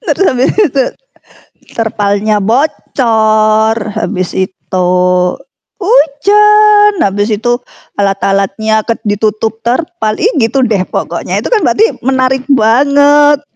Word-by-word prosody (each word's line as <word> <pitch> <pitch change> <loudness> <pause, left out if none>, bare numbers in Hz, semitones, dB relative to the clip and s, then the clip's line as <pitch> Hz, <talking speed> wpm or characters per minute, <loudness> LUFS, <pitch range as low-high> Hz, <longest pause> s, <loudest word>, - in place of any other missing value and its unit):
terus 390 - -1
habis 255 -2 +1
itu 315 -11 +1 0.9
terpalnya 210 -2 -1
bocor, 220 -2 +1 0.2
habis 185 -4 -3
itu 185 -1 -3 0.9
hujan, 420 - +3
habis 205 +2 0
itu 240 +3 -1 0.4
alat-alatnya 200 +2 -1
ked 230 - -2
ditutup 215 +1 -2
terpal, 245 -3 -2
ih 445 +7 +2
gitu 245 +4 +1
deh 215 -5 0
pokoknya, - - -3
itu - - -5
kan 440 - +3
berarti 440 - +3 0.2
menarik 260 0 0
banget. 285 +5 +3
230 Hz, 100 wpm, -11 LUFS, 215-290 Hz, 0.9 s, hujan